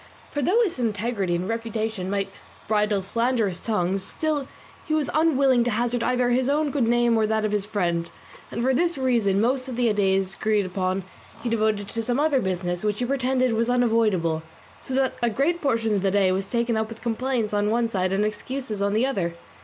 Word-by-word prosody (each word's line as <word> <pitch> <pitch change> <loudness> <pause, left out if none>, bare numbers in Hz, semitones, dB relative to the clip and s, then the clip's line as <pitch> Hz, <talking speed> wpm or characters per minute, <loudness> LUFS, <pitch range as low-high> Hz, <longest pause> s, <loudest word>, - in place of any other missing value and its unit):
For 290 - -2
though 375 - +3
his 355 - -2
integrity 210 -5 -1
and 180 +2 -2
reputation 225 -3 -3
might 195 -1 -1 0.4
bridle 210 -2 +1
slanderous 230 -3 0
tongues, 195 -3 0
still 295 +5 -2 0.4
he 310 - +1
was 300 -3 0
unwilling 275 -6 +3
to - - +1
hazard 240 +2 0
either 250 0 +1
his 255 +2 +2
own 295 0 +1
good 265 -5 +1
name 240 0 +3
or 220 -1 +2
that 220 0 0
of 215 - -1
his 205 -1 -1
friend; 170 -5 -1 0.4
and 235 - -3
for 265 +1 +3
this 340 +4 +1
reason 235 -7 +2
most 255 +4 +1
of 250 - -4
the 235 -3 +2
days 195 -2 +1
agreed 215 -2 +1
upon 185 +1 -2 0.4
he 240 - -1
devoted 215 -3 0
to 230 - -2
some 245 +3 -1
other 295 -2 +3
business 180 -2 -2
which 210 -1 0
he 245 - -1
pretended 255 -1 +1
was 230 +2 +1
unavoidable; 220 -10 +2 0.4
so 260 - -5
that 265 -1 +2
a 240 - +2
great 290 +10 0
portion 230 -6 +1
of 200 - +1
the 195 - +2
day 195 -1 +3
was 190 +1 -1
taken 235 -1 0
up 220 0 -1
with 225 -1 -10
complaints 235 -2 -1
on 205 0 +1
one 230 +1 +2
side 185 -4 -1
and 200 +2 +1
excuses 215 0 -4
on 200 0 +1
the 230 +4 +3
other. 185 -11 -1
225 Hz, 210 wpm, -24 LUFS, 200-250 Hz, 0.4 s, though